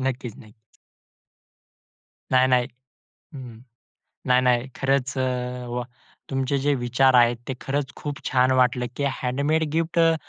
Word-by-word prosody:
नक्कीच, 125 -4 -3
नक्कीच. 110 0 -19 1.6
नाही, 130 0 +4
नाही. 125 -1 +3 0.7
हं, 140 - -8
हं. 115 0 -14 0.7
नाही, 125 0 +4
नाही. 125 -1 +2
खरंच 135 0 0
अ, 125 -1 -2
वा! 120 0 -3 0.5
तुमचे 135 +1 0
जे 145 +2 +1
विचार 130 +1 +2
आहेत. 120 -1 +5
ते 135 - -2
खरंच 140 0 -3
खूप 145 -2 -5
छान 130 0 +2
वाटलं, 125 0 +2
की 140 - -1 0.2
हँडमेड 140 +5 0
गिफ्ट 165 +1 0
अ, 165 -1 +5
130 Hz, 140 wpm, -24 LUFS, 125-140 Hz, 1.6 s, आहेत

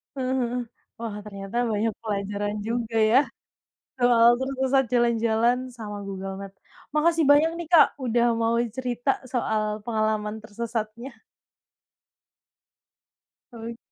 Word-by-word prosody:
Heeh 260 -1 -2
heeh, 245 +1 -1 0.4
wah 225 -3 -4
ternyata 200 +2 -6
banyak 215 +2 +1
pelajaran 205 -1 -3
juga 230 -1 -2 0.2
ya, 260 - +7 0.8
soal 240 -1 +6
tersesat 265 0 +1
jalan-jalan 235 0 +3 0.2
sama 210 -2 -6
Google 195 0 -5
Maps, 195 0 -11 0.3
makasih 325 +2 +2
banyak 300 +3 +6
nih 340 -1 -6
Kak, 335 - +8 0.2
udah 235 -1 +2
mau 230 +1 +1 0.2
cerita 255 +1 -1 0.2
soal 215 -3 -1
pengalaman 215 -1 -1
tersesatnya. 230 +3 -5 2.4
Oke. 230 0 -7
230 Hz, 110 wpm, -25 LUFS, 215-245 Hz, 2.4 s, Kak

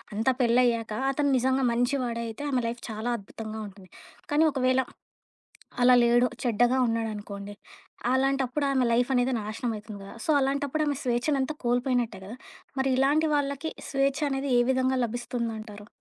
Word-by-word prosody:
అంత 220 +3 -2
పెళ్లయ్యాక 235 -2 +2 0.2
అతను 285 0 +1
నిజంగా 260 +1 +1
మంచి 245 +4 +1
వాడయితే, 235 +1 -4
ఆమె 255 -2 +1
లైఫ్ 235 +1 -5
చాలా 220 +3 -3
అద్భుతంగా 220 +2 -8
ఉంటుంది. 195 -2 -15 0.4
కానీ 300 +2 +4
ఒకవేళ, 255 -1 +2 1.0
అలా 250 +1 +7
లేడు. 240 +1 +4 0.2
చెడ్డగా 245 +1 +2
ఉన్నాడనుకోండి. 210 -3 -4 0.6
అలాంటప్పుడు 270 +1 +1
ఆమె 260 -2 +2
లైఫనేది 245 +2 +2
నాశనమైతుంది 215 -1 -5
గదా! 195 - -10
సో, - - -6
అలాంటప్పుడు 280 +2 0
ఆమె 285 -2 0
స్వేచ్ఛనంతా 265 +4 0
కోల్పోయినట్టే 245 -3 0
గదా! 225 +6 -8 0.4
మరి 265 0 +1
ఇలాంటి 295 +4 +3
వాళ్ళకి 280 +2 -1 0.2
స్వేచ్ఛ 275 0 +1
అనేది 270 0 -2
ఏ - - +5
విధంగా 260 0 +1
లభిస్తుందంటారు? 225 -3 -5
245 Hz, 135 wpm, -27 LUFS, 225-270 Hz, 1.0 s, అలా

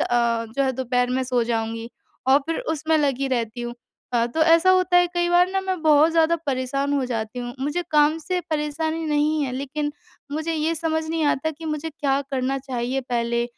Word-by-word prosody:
अ, 235 -1 +1
जो 275 - +3
है 265 - +1
दोपहर 250 -1 0
में 260 +1 0
सो 250 -2 +1
जाऊँगी 225 0 -3 0.4
और 270 +1 +7
फिर 330 - -1 0.2
उसमें 315 +1 +1
लगी 275 -2 0
रहती 240 -2 -2
हूँ। 240 0 -5 0.4
अ, 235 -1 +2
तो 240 +7 -3
ऐसा 330 +3 +5
होता 370 -1 +4
है 355 - +4
कई 345 0 +1
बार 355 +1 +5
ना 385 0 0
मैं 375 -2 -2
बहुत 310 0 +5
ज़्यादा 330 0 +3
परेशान 275 +1 -1
हो 275 -2 +1
जाती 225 -1 -4
हूँ। 245 0 -5
मुझे 295 +6 -1
काम 300 +1 +4
से 360 +3 -2
परेशानी 315 +2 -1
नहीं 300 +1 +1
है 265 - -3
लेकिन 285 +3 -3 0.4
मुझे 315 +2 -2
ये 315 +1 0
समझ 320 0 -1
नहीं 325 -1 0
आता 290 +2 +1
कि 320 +2 -12
मुझे 305 +1 -3
क्या 280 -2 0
करना 265 0 0
चाहिए 260 -1 -3
पहले 235 0 0
285 Hz, 205 wpm, -23 LUFS, 250-320 Hz, 0.4 s, और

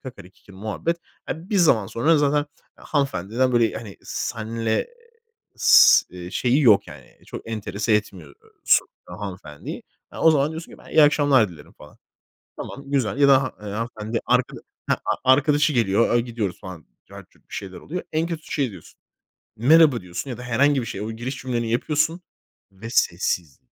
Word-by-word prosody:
Kakari 125 -9 -11
kikiri 95 0 -19
muhabbet. 110 - -3 0.3
Eee, 165 +5 -6
bir 210 - +1
zaman 135 - +4
sonra 150 +10 +2
zaten 145 0 +1 0.3
hanımefendiden 130 - -1
böyle, 115 -2 +3
hani, 105 -4 -8
seninle 110 0 -3 0.7
s - - +7
eee, 90 -1 -9
şeyi 125 +8 +1
yok 105 -6 +5
yani - - -14
çok - - -9
enterese 110 0 -2
etmiyor 95 -8 -3 0.3
so - - +4 0.2
hanımefendiyi. 90 -5 -8 0.3
E, - - -11
o 160 - +5
zaman 145 -1 +2
diyorsun 160 +1 -8
ki, - - -14
"Ben - - -16
iyi 155 - +5
akşamlar 145 -6 +4
dilerim." 80 -5 -14
falan. 75 - -17 0.6
Tamam, 140 - -8
güzel 135 -3 0
ya 140 - +5
da 135 -1 +5
ha 130 - -5
eee, 105 - -8
hanımefendi 110 +1 -4
arka - - +1 0.3
heh, - - +4
a 130 - 0
arkadaşı 150 +2 +2
geliyor, 115 -1 +2
eee, 120 - +4
gidiyoruz 115 -6 -4
falan. 90 -4 -10 0.2
Cart - - -12
curt - - -30
bir - - -14
şeyler 95 -2 -7
oluyor. 180 +4 -6
En 160 +2 0
kötüsü 165 -2 -7
şey 135 -6 0
diyorsun. 95 -5 -15 0.6
"Merhaba" 145 +2 +5
diyorsun 90 +9 -6
ya 120 - -6
da - - -8
herhangi 135 +3 +2
bir 115 - -5
şey. 100 - -6
O 105 +2 -4
giriş 120 +4 -5
cümleni 120 -3 -3
yapıyorsun. 155 +7 0 0.5
Ve 110 +4 -9
sessiz. 85 - 0
120 Hz, 175 wpm, -23 LUFS, 100-145 Hz, 0.7 s, s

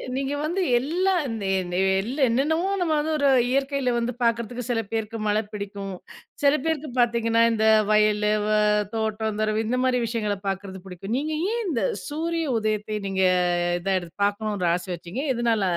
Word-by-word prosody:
நீங்க 275 +1 -1
வந்து 360 +5 -1 0.2
எல்லா, 360 +8 0
இந்த 225 -4 -4 0.2
இந்த, 180 0 -4 0.2
எல்லா 260 +8 -4
என்னென்னமோ 320 +10 +1
நம்ம 325 -3 +1
வந்து 310 +1 -1
ஒரு 285 -1 +3 0.2
இயற்கையில 275 -2 0
வந்து 235 +1 -1
பாக்கறதுக்கு 235 +1 0
சில 225 -2 +1
பேருக்கு 225 0 -3
மழ 210 +1 +2
பிடிக்கும், 200 -1 -6 0.5
சில 280 0 +6
பேருக்கு 310 -3 -1
பாத்தீங்கன்னா 230 -1 +2
இந்த 220 -1 +1 0.3
வயலு 210 0 +3 0.2
வ, - - -1 0.5
தோட்டம் 220 -1 -2
தொரவு 215 +1 +1
இந்த 250 +2 0
மாரி 255 -1 +2
விஷயங்கள 215 -3 -1
பாக்கறது 190 -1 -4
பிடிக்கும். 195 +5 -5
நீங்க 310 +2 -2 0.2
ஏன்? 470 -1 -1
இந்த 230 -9 -1 0.2
சூரிய 330 +2 -2
உதயத்த, 215 -1 -1
நீங்க 190 0 0 0.6
இத 195 +2 -1 0.3
பாக்கணுன்ற 205 -3 0
ஆசை 180 +1 -5
வெச்சிங்க 175 - -5
எதனால, 230 -3 +1
225 Hz, 155 wpm, -24 LUFS, 210-275 Hz, 0.6 s, சில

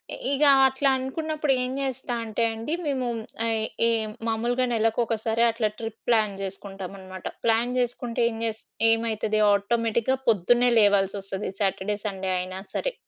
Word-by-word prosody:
ఇ - - -10
ఇగ 280 +2 +2 0.2
అట్లా 265 +1 +2
అనుకున్నప్పుడు 300 +2 -1
ఏం 250 - -2
చేస్తా 260 -2 -3
అంటె 225 +1 -2
అండి. 225 +7 -4
మేము 265 -3 -1 0.4
ఈ, 225 -1 +1 0.3
ఈ - - +3 0.4
మామూలుగా 240 +3 0
నెలలకొకసారి 225 0 +1
అట్లా 225 -1 0
ట్రిప్ 225 -1 -6
ప్లాన్ 215 -4 +2
చేసుకుంటామన్నమాట. 195 -1 -7 0.2
ప్లాన్ 230 +2 +2
చేసుకుంటే 245 -1 -1
ఏం 225 - -6
జేస్ 220 -1 -2 0.3
ఏం - - +7
ఏమైతది 220 -1 -1
ఆటోమేటిక్‌గా 230 +4 +1
పొద్దున్నే 240 +4 +4
లేవాల్సోస్తది. 195 -1 +1
సాటర్‌డే, 200 0 0
సండే 190 -2 -3
అయినా 185 +1 -5
సరే. - - -2
225 Hz, 140 wpm, -25 LUFS, 205-245 Hz, 0.4 s, ఏం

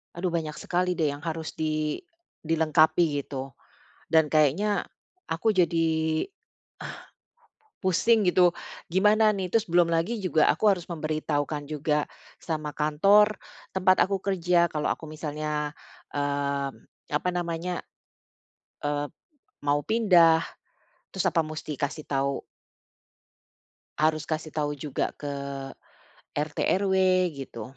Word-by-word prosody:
aduh 175 0 -1
banyak 155 -3 -2
sekali 180 0 -1
deh 155 -4 +1
yang 145 - -7
harus 160 0 -4
di 155 -1 -1 0.4
dilengkapi, 160 -1 +3
gitu. 135 0 -5 0.5
Dan 160 -1 +3
kayaknya 160 +8 +2 0.5
aku 165 +7 -1
jadi, 160 - +1 0.5
eh, - - -6 0.8
pusing, 205 +3 +3
gitu, 180 -1 +5 0.4
gimana, 210 +4 +4
nih? 195 -3 -2
Terus 220 -5 +2
belum 175 0 +5
lagi 170 +8 0
juga 160 -6 +3
aku 215 - +1
harus 185 -4 +2
memberitahukan 155 -2 -2
juga 150 0 0 0.4
sama 155 -3 -3
kantor 195 +8 +4 0.3
tempat 185 0 +4
aku 195 +1 0
kerja 180 -3 +2
kalau 150 -1 -1
aku 160 - -3
misalnya, 150 -1 -3 0.4
eee, 140 -1 -1 0.4
apa 150 +5 +1
namanya, 175 0 -3 1.1
eee, 145 0 -1 0.6
mau 145 +1 +3
pindah, 180 -8 +5 0.7
terus, 190 0 -1
apa 165 -2 +3
musti 155 -1 -6
kasih 145 +2 -4
tau 140 0 -1 1.5
harus 155 0 +1
kasih 155 0 -3
tau 150 -1 -1
juga 140 -1 -2
ke 140 -1 -5 0.9
RT, 150 +1 -2 0.2
RW, 190 -1 +1 0.4
gitu. 135 -1 -8
160 Hz, 115 wpm, -27 LUFS, 150-180 Hz, 1.5 s, gitu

